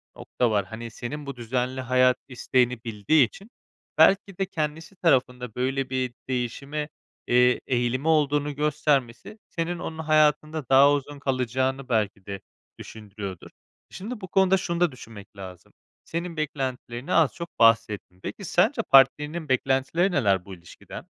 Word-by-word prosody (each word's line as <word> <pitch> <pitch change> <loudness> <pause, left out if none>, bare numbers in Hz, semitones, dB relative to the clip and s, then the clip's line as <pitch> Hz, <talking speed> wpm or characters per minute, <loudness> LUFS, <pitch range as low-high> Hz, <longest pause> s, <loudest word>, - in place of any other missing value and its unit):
nokta 120 -2 -1
var. 100 -2 +1
Hani, 115 +3 -8
senin 145 +7 -6
bu 140 -1 -6
düzenli 125 +2 -2
hayat 125 0 +3
isteğini 125 -2 0
bildiği 115 +5 +2
için 200 - -15 0.5
belki 195 -1 +4
de 195 - 0
kendisi 160 +1 -4
tarafında 125 - 0
böyle 135 +1 -1
bir 130 -1 -2 0.2
değişime, 140 +4 -3 0.4
eee, 125 +1 +4
eğilimi 125 +3 0
olduğunu 145 -2 +2
göstermesi 150 - -1
senin 170 +1 -3
onun 160 -2 -6
hayatında 155 -2 +1
daha 135 +2 +7
uzun 145 0 -4
kalacağını 130 0 -1
belki 105 -4 -1
de 100 -1 -6 0.4
düşündürüyordur. 100 -4 -9 0.4
Şimdi, 215 +4 -7
bu 190 - -6
konuda 190 0 +3
şunu 170 -2 -3
da 175 -2 +3
düşünmek 110 -5 -13
lazım, 95 -3 -11 0.3
senin 170 0 -5
beklentilerini 130 -4 -4
az 160 -4 +4
çok 170 0 -9
bahsettin. 115 -5 +2
Peki, 200 - -6
sence 220 - +2
partnerinin 150 - +3
beklentileri 135 +8 +1
neler 100 - +1
bu 100 - -9
ilişkiden? 85 -1 -12
135 Hz, 140 wpm, -25 LUFS, 120-155 Hz, 0.5 s, daha